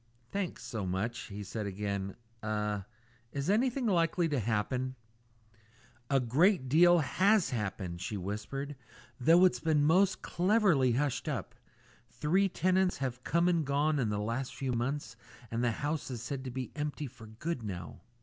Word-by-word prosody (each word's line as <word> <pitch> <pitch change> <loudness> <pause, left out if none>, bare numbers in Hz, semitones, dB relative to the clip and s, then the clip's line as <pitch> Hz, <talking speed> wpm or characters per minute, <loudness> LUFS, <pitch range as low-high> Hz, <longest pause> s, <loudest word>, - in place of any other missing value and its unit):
"Thanks 195 -3 -3
so 105 -5 -4
much," 110 +6 -2
he 105 0 -6
said 105 +1 -4
again. 100 -1 -3 0.3
"Er 105 -2 -2 0.4
is 140 +7 -1
anything 250 +4 +1
likely 170 -3 +2
to 145 -3 0
happen?" 120 +4 -1 1.1
"A 135 - +4
great 135 - +3
deal 175 +6 +6
has 190 +6 +3
happened," 95 -6 -3
she 105 +2 -3
whispered, 110 +10 -4 0.4
"though 165 +8 +6
it's 185 - +3
been 155 -2 +2
most 185 +5 +3
cleverly 175 - +3
hushed 140 +2 0
up. - - -4 0.6
Three 190 +6 +2
tenants 185 +1 +2
have 130 -2 -3
come 170 +1 +2
and 170 -3 +2
gone 145 +2 +1
in 120 -5 +1
the 105 - -1
last 115 +5 -3
few 130 -2 -2
months, 135 +5 -2 0.4
and 115 +1 -1
the 120 - +3
house 145 +6 -2
is 120 -3 -5
said 130 +2 -4
to - - -3
be 130 0 -5
empty 150 0 -3
for 125 -4 -11
good 125 +7 -4
now." 90 -6 -6
135 Hz, 160 wpm, -31 LUFS, 110-170 Hz, 1.1 s, deal